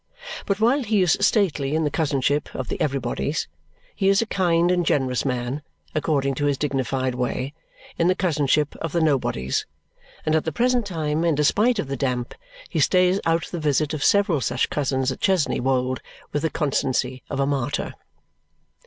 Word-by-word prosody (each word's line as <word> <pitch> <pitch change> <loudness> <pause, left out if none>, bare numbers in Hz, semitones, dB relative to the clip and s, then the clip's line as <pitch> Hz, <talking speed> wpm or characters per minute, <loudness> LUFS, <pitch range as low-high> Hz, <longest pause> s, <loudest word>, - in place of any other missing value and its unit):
But 200 0 0
while 245 +6 +3
he 210 -5 +2
is 175 - +4
stately 160 -10 +2
in 160 - +1
the 150 - 0
cousinship 145 -2 0
of 130 - -4
the - - -3
Everybodys, 135 +1 -1 0.5
he 195 -1 +2
is 195 0 +4
a 230 - +1
kind 175 -4 +2
and 180 -1 +2
generous 130 -5 0
man, 125 +2 -2 0.3
according 145 -3 0
to - - +2
his 145 -1 +1
dignified 130 -2 -1
way, 125 +2 -2 0.5
in 170 - +3
the 185 - +3
cousinship 150 -5 +1
of 165 -3 -5
the 170 - +2
Nobodys; 130 - 0 0.6
and 155 - +1
at 160 - +2
the 160 - -2
present 245 +4 +1
time, 160 -3 -1
in 165 -3 +2
despite 210 - +3
of 180 - -2
the 135 - -3
damp, 125 -2 -2 0.3
he - - -2
stays 185 +1 +3
out 165 0 +2
the 175 - -3
visit 150 0 +1
of 150 -2 -2
several 200 -8 +3
such 125 0 0
cousins 130 -2 0
at 130 - -7
Chesney 190 -6 +2
Wold 130 0 0 0.3
with 145 - -1
the 160 - 0
constancy 130 -4 -1
of - - -3
a 140 - +3
martyr. 140 -1 -2
150 Hz, 180 wpm, -23 LUFS, 135-175 Hz, 0.6 s, is